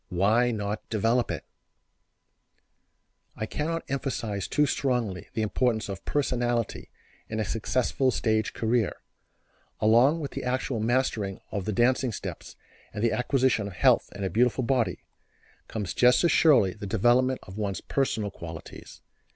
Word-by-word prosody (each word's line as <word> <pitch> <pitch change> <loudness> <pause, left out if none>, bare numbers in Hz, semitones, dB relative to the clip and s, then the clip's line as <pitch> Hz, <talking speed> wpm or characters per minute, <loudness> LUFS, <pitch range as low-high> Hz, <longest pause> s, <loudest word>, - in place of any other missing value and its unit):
Why 105 +7 +3
not 105 -2 -4
develop 115 +3 +1
it?" - - -4 1.9
I 110 - -3
cannot 165 +7 -3
emphasize 115 -7 -3
too 150 - +2
strongly 125 -9 -1
the 110 - 0
importance 110 -1 0
of 95 0 -6
personality 120 -5 -1 0.4
in 110 - -3
a 110 - 0
successful 125 +5 0
stage 110 -3 0
career. 115 -2 0 0.8
Along 120 +9 +4
with 145 -3 -5
the - - -5
actual 125 -1 -1
mastering 110 -4 0
of 100 -3 -3
the 110 - -1
dancing 125 +4 +2
steps - - -7 0.4
and 105 +1 -4
the 115 - +3
acquisition 125 -4 +1
of 100 - -8
health - - +3
and 100 - -4
a 95 - -2
beautiful 125 +3 +2
body, 125 -2 0 0.6
comes 105 -5 -4
just 125 +5 +4
as 170 - +4
surely 130 - +5
the 105 -1 -7
development 120 +5 +2
of 95 +3 -9
one's 100 -4 -2
personal 110 -7 -1
qualities. 80 -3 -10
115 Hz, 145 wpm, -27 LUFS, 105-130 Hz, 1.9 s, surely